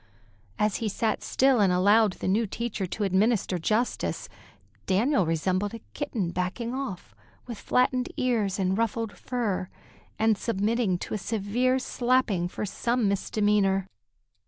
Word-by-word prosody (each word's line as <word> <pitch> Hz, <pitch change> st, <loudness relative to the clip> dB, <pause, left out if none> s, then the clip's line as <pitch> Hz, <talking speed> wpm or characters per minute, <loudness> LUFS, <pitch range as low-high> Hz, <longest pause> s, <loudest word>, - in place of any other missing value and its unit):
As 210 Hz, -1 st, +1 dB
he 225 Hz, -, -2 dB
sat 220 Hz, +2 st, -1 dB
still 265 Hz, -2 st, +3 dB
and 195 Hz, -3 st, +4 dB
allowed 205 Hz, +3 st, +4 dB
the -, -, -5 dB
new 210 Hz, +4 st, +2 dB
teacher 210 Hz, -2 st, -3 dB
to 210 Hz, +4 st, -3 dB
administer 195 Hz, -1 st, +1 dB
justice, 220 Hz, +8 st, -1 dB, 0.6 s
Daniel 200 Hz, -, +2 dB
resembled 185 Hz, +6 st, 0 dB
a -, -, -7 dB
kitten 225 Hz, -, -2 dB
backing 185 Hz, +7 st, -3 dB
off, 255 Hz, -9 st, -5 dB, 0.3 s
with 235 Hz, -4 st, -7 dB
flattened 250 Hz, 0 st, +1 dB
ears 220 Hz, -6 st, 0 dB
and 190 Hz, -1 st, +1 dB
ruffled 230 Hz, -1 st, -1 dB
fur, 210 Hz, -7 st, -2 dB, 0.5 s
and 220 Hz, -2 st, +2 dB
submitting 215 Hz, -2 st, 0 dB
to -, -, -6 dB
a 215 Hz, -, -1 dB
severe 225 Hz, +5 st, 0 dB
slapping 245 Hz, -8 st, +1 dB
for 185 Hz, -, -4 dB
some 235 Hz, +3 st, 0 dB
misdemeanor. 200 Hz, -1 st, +1 dB
210 Hz, 135 wpm, -27 LUFS, 190-235 Hz, 0.6 s, and